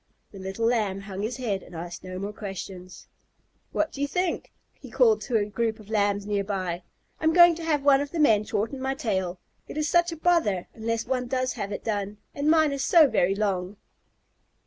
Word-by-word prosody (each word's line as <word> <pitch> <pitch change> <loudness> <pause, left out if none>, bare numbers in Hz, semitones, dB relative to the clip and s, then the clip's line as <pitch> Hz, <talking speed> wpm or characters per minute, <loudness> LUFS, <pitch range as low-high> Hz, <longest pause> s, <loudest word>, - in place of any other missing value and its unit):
The 195 - -11
little 195 +4 -3
Lamb 210 -5 +1
hung 195 -1 -6
his 230 +4 -3
head 210 -7 -2
and - - -13
asked 170 +1 -7
no 185 0 -6
more 200 +2 -4
questions. 190 -3 -8 0.7
"What 310 - 0
do 280 - -7
you 285 - +1
think?" 360 +3 -2 0.2
he - - -13
called 455 -3 +4
to 240 - 0
a 205 - +1
group 220 +1 -2
of 215 0 -13
Lambs 205 -1 +1
near 205 -1 0
by. 185 -3 -3 0.4
"I'm 320 0 +2
going 345 0 +8
to 335 - -7
have 300 -3 0
one 280 -1 +5
of 285 - -3
the 340 - -5
men 220 -9 +4
shorten 225 +6 -2
my 265 +1 -1
tail. 190 - -2 0.3
It - - -8
is 305 0 0
such 345 +2 +3
a 330 - -6
bother 310 - +2
unless 230 0 -2
one 250 -1 -1
does 255 0 -1
have 200 - -5
it - - -5
done, 205 -2 -2 0.2
and 285 +2 0
mine 315 -2 +4
is 275 -1 -2
so 325 -4 +6
very 195 -5 +2
long!" 195 -1 -1
220 Hz, 215 wpm, -26 LUFS, 195-285 Hz, 0.7 s, going